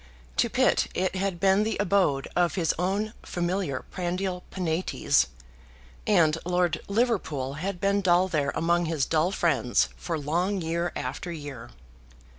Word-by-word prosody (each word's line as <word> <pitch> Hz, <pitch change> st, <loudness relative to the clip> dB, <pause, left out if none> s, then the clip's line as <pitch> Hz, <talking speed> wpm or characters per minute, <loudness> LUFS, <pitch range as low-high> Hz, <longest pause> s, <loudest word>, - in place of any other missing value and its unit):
To -, -, +3 dB
Pitt -, -, +2 dB
it 185 Hz, 0 st, 0 dB
had 190 Hz, -2 st, -1 dB
been 195 Hz, +1 st, +4 dB
the 220 Hz, +1 st, 0 dB
abode 185 Hz, -9 st, +2 dB
of 175 Hz, -1 st, +2 dB
his 170 Hz, -5 st, +1 dB
own 200 Hz, +4 st, 0 dB
familiar 175 Hz, -6 st, -2 dB
prandial 180 Hz, 0 st, -2 dB
Penates, 165 Hz, -, +1 dB, 0.8 s
and 165 Hz, -6 st, +4 dB
Lord 180 Hz, -1 st, +1 dB
Liverpool 200 Hz, -, 0 dB
had 180 Hz, +5 st, -4 dB
been 200 Hz, +1 st, +2 dB
dull 180 Hz, 0 st, +4 dB
there 150 Hz, -6 st, 0 dB
among 170 Hz, +1 st, +2 dB
his 160 Hz, -4 st, 0 dB
dull 165 Hz, +3 st, +1 dB
friends 135 Hz, -, +2 dB
for 165 Hz, -2 st, -3 dB
long 175 Hz, +7 st, 0 dB
year 170 Hz, +1 st, -1 dB
after 135 Hz, +8 st, -4 dB
year. 145 Hz, -7 st, -7 dB
175 Hz, 140 wpm, -27 LUFS, 155-190 Hz, 0.8 s, been